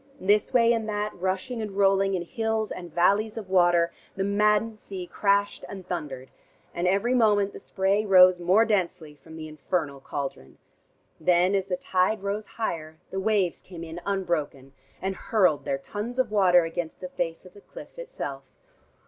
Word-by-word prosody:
This 205 Hz, +2 st, +2 dB
way 235 Hz, -2 st, +4 dB
and 220 Hz, -2 st, -2 dB
that, 210 Hz, 0 st, -2 dB
rushing 190 Hz, +7 st, -3 dB
and 210 Hz, -2 st, -5 dB
rolling, 195 Hz, -1 st, +3 dB
in 175 Hz, -, -2 dB
hills 220 Hz, +2 st, -2 dB
and 175 Hz, -2 st, -7 dB
valleys 200 Hz, +7 st, +2 dB
of 200 Hz, -4 st, -7 dB
water, 175 Hz, -2 st, +4 dB, 0.2 s
the 195 Hz, -, -1 dB
maddened 210 Hz, +2 st, +2 dB
sea 190 Hz, -3 st, -7 dB
crashed 200 Hz, +2 st, 0 dB
and 190 Hz, -2 st, -8 dB
thundered, 145 Hz, -8 st, -5 dB, 0.4 s
and 175 Hz, +1 st, -1 dB
every 200 Hz, +7 st, +2 dB
moment 205 Hz, -4 st, +3 dB
the -, -, -9 dB
spray 195 Hz, +2 st, 0 dB
rose 185 Hz, -3 st, +6 dB
more 185 Hz, +6 st, +4 dB
densely 175 Hz, -7 st, -1 dB
from 150 Hz, +2 st, -15 dB
the 155 Hz, -1 st, -7 dB
infernal 155 Hz, -1 st, -3 dB
cauldron. 135 Hz, -, -6 dB, 0.6 s
Then 180 Hz, +3 st, +3 dB
as 195 Hz, -1 st, 0 dB
the 180 Hz, -2 st, -1 dB
tide 190 Hz, +3 st, 0 dB
rose 205 Hz, +2 st, -3 dB
higher, 160 Hz, -8 st, -3 dB
the 190 Hz, -, -2 dB
waves 195 Hz, -3 st, +1 dB
came 175 Hz, -3 st, -10 dB
in 165 Hz, +1 st, -7 dB
unbroken, 165 Hz, -9 st, -2 dB, 0.3 s
and 190 Hz, 0 st, -1 dB
hurled 180 Hz, -8 st, +1 dB
their 135 Hz, -, 0 dB
tons 210 Hz, -, -6 dB
of 260 Hz, -4 st, +1 dB
water 180 Hz, -4 st, +5 dB
against 165 Hz, 0 st, -5 dB
the 180 Hz, -, -6 dB
face 165 Hz, -1 st, -4 dB
of 180 Hz, -, -14 dB
the 205 Hz, -, -15 dB
cliff -, -, -12 dB
itself. -, -, -6 dB
190 Hz, 175 wpm, -26 LUFS, 175-210 Hz, 0.6 s, rose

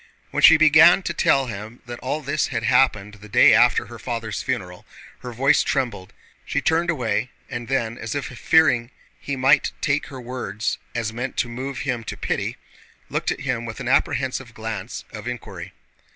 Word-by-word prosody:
When -, -, -1 dB
she 160 Hz, -, +9 dB
began 160 Hz, +4 st, +6 dB
to 170 Hz, -, -2 dB
tell 135 Hz, -4 st, +2 dB
him 110 Hz, +1 st, -8 dB
that 120 Hz, 0 st, -8 dB
all 135 Hz, +5 st, -3 dB
this 145 Hz, +1 st, -1 dB
had -, -, -3 dB
happened 105 Hz, -6 st, +2 dB
the 105 Hz, -, -12 dB
day -, -, +6 dB
after 120 Hz, +2 st, +4 dB
her 120 Hz, -1 st, -11 dB
father's 115 Hz, -4 st, -4 dB
funeral, 90 Hz, -9 st, -4 dB, 0.4 s
her 125 Hz, -, -7 dB
voice 135 Hz, +5 st, +3 dB
trembled. 120 Hz, -9 st, -2 dB, 0.3 s
She -, -, -1 dB
turned 165 Hz, +2 st, +1 dB
away, 120 Hz, -6 st, -1 dB, 0.2 s
and 120 Hz, -1 st, -5 dB
then, 120 Hz, -3 st, -1 dB
as 115 Hz, +2 st, -5 dB
if 140 Hz, -, -2 dB
fearing 125 Hz, -1 st, +2 dB, 0.3 s
he 140 Hz, -, -4 dB
might 135 Hz, +2 st, +3 dB
take 145 Hz, +2 st, 0 dB
her 135 Hz, -, -9 dB
words 120 Hz, -4 st, -4 dB, 0.2 s
as 110 Hz, -2 st, -2 dB
meant 125 Hz, +3 st, -5 dB
to -, -, +1 dB
move 125 Hz, +2 st, -5 dB
him 120 Hz, -1 st, -2 dB
to -, -, -6 dB
pity, -, -, -3 dB, 0.5 s
looked -, -, -2 dB
at -, -, -3 dB
him 130 Hz, -4 st, -2 dB
with 115 Hz, +1 st, -7 dB
an 125 Hz, -, -5 dB
apprehensive 130 Hz, -2 st, 0 dB
glance 110 Hz, 0 st, -6 dB
of 105 Hz, +1 st, -8 dB
inquiry. 125 Hz, -2 st, -7 dB
125 Hz, 180 wpm, -22 LUFS, 115-135 Hz, 0.5 s, she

